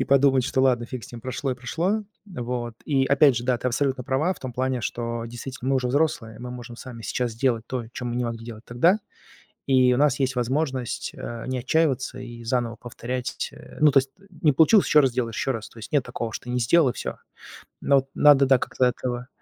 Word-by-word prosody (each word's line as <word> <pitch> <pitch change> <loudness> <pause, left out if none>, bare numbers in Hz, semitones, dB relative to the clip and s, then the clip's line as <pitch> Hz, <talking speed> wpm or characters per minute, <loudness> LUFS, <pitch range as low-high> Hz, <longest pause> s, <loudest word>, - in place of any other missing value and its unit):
и - - +2
подумать, 135 -1 +4
что 130 0 0
ладно, 125 -3 +3
фиг 125 -2 -6
с - - -13
ним, 120 - -8
прошло 130 +3 -3
и - - -4
прошло. 170 - -1 0.2
Вот. 120 - -4
И 135 -3 +2
опять 140 -2 +5
же, 120 - -2
да, 125 -1 +2
ты 125 - -1
абсолютно 130 0 -1
права 150 +10 +1
в - - -17
том 130 -2 -5
плане, 130 +1 -1
что 115 0 -3
действительно 125 +2 -5
мы 135 - +3
уже 125 -1 0
взрослые, 130 -6 0
мы 125 0 -6
можем 120 -1 -8
сами 120 -2 -9
сейчас 120 +1 -2
сделать 115 -1 0
то, 125 -1 -3
чё 125 - -6
мы 120 0 -2
не 125 - 0
могли 115 -1 -4
делать 115 -1 -9
тогда. 165 - +3 0.7
И 130 -2 +4
у - - +1
нас 145 -1 +3
есть 130 -1 +1
возможность, 130 0 -1
э, 115 -1 -6
не 130 0 -2
отчаиваться 135 -2 0
и 120 -2 -8
заново 120 0 0
повторять 120 +2 -5
ть - - -3
Э, - - -13
ну, 150 -1 +6
то 135 - +6
есть 135 0 -9 0.3
не 150 - +5
получилось 165 - +5
ещё 150 - +6
раз 135 - +3
сделай, 120 -1 -1
ещё 135 - -1
раз. 115 -2 -6
То - - -16
есть 110 - -9
нет 145 -3 +3
такого, 120 -2 -4
что - - -6
ты 125 - -6
не 125 - 0
сделал 140 +5 +4
и - - -3
всё. - - -5 0.7
Но 140 - +3
вот 135 - 0
надо, 145 -2 +6
да, 135 - +6
как-то 130 - 0
этого. 125 0 -2
125 Hz, 240 wpm, -25 LUFS, 120-135 Hz, 0.7 s, ну